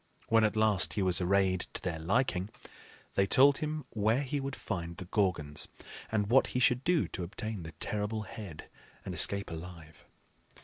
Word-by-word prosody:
When 115 Hz, 0 st, +5 dB
at 110 Hz, 0 st, +2 dB
last 100 Hz, -8 st, +3 dB
he 95 Hz, -, 0 dB
was 90 Hz, -1 st, +2 dB
arrayed 95 Hz, 0 st, +2 dB
to -, -, -3 dB
their 85 Hz, -3 st, -2 dB
liking, 95 Hz, +1 st, 0 dB, 0.6 s
they 95 Hz, -, +2 dB
told 140 Hz, +6 st, +6 dB
him 155 Hz, -1 st, -3 dB
where 110 Hz, +5 st, +1 dB
he 140 Hz, +2 st, -2 dB
would 135 Hz, 0 st, -4 dB
find 85 Hz, -4 st, -5 dB
the 90 Hz, -, -6 dB
Gorgons, 90 Hz, -7 st, -1 dB, 0.4 s
and 105 Hz, -2 st, +1 dB
what 125 Hz, +6 st, +4 dB
he -, -, +2 dB
should 125 Hz, 0 st, +3 dB
do 175 Hz, -2 st, +2 dB
to -, -, -6 dB
obtain 110 Hz, +3 st, -5 dB
the 80 Hz, -1 st, -8 dB
terrible 105 Hz, +3 st, -3 dB
head 100 Hz, -6 st, -9 dB, 0.4 s
and -, -, -4 dB
escape 100 Hz, -2 st, +3 dB
alive. 80 Hz, -1 st, -9 dB
100 Hz, 175 wpm, -31 LUFS, 90-115 Hz, 0.6 s, told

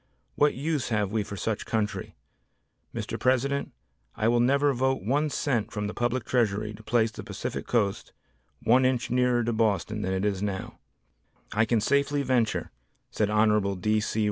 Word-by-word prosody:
What 150 Hz, 0 st, +3 dB
use 145 Hz, -1 st, -1 dB
have 105 Hz, -3 st, 0 dB
we 110 Hz, 0 st, +1 dB
for 100 Hz, 0 st, -6 dB
such 110 Hz, +3 st, -2 dB
country? 110 Hz, -2 st, -2 dB, 0.8 s
Mr. -, -, -4 dB
President, 135 Hz, +2 st, +1 dB, 0.4 s
I 110 Hz, +1 st, +1 dB
will 120 Hz, 0 st, +3 dB
never 140 Hz, +3 st, +3 dB
vote 130 Hz, -2 st, 0 dB
1 145 Hz, +8 st, +1 dB
cent 130 Hz, -7 st, -1 dB
from 105 Hz, -2 st, -3 dB
the 105 Hz, -, -3 dB
Public 120 Hz, 0 st, -1 dB
Treasury 110 Hz, -3 st, 0 dB
to 105 Hz, -, -11 dB
place 110 Hz, 0 st, +1 dB
the -, -, -8 dB
Pacific -, -, -5 dB
Coast 105 Hz, -5 st, 0 dB, 0.5 s
1 125 Hz, +3 st, +5 dB
inch 130 Hz, -2 st, +1 dB
nearer 125 Hz, -1 st, +2 dB
to 120 Hz, +1 st, -1 dB
Boston 105 Hz, -1 st, 0 dB
than 95 Hz, -, -2 dB
it 95 Hz, 0 st, 0 dB
now 100 Hz, -2 st, -2 dB
is." -, -, -12 dB, 0.8 s
"I 110 Hz, +2 st, +3 dB
can 110 Hz, -1 st, +1 dB
safely 140 Hz, +4 st, +1 dB
venture," 125 Hz, -4 st, 0 dB, 0.4 s
said 105 Hz, -1 st, 0 dB
Hon. 105 Hz, -2 st, +2 dB
D. 110 Hz, +3 st, +2 dB
C. 110 Hz, +1 st, -2 dB
115 Hz, 170 wpm, -27 LUFS, 105-130 Hz, 0.8 s, 1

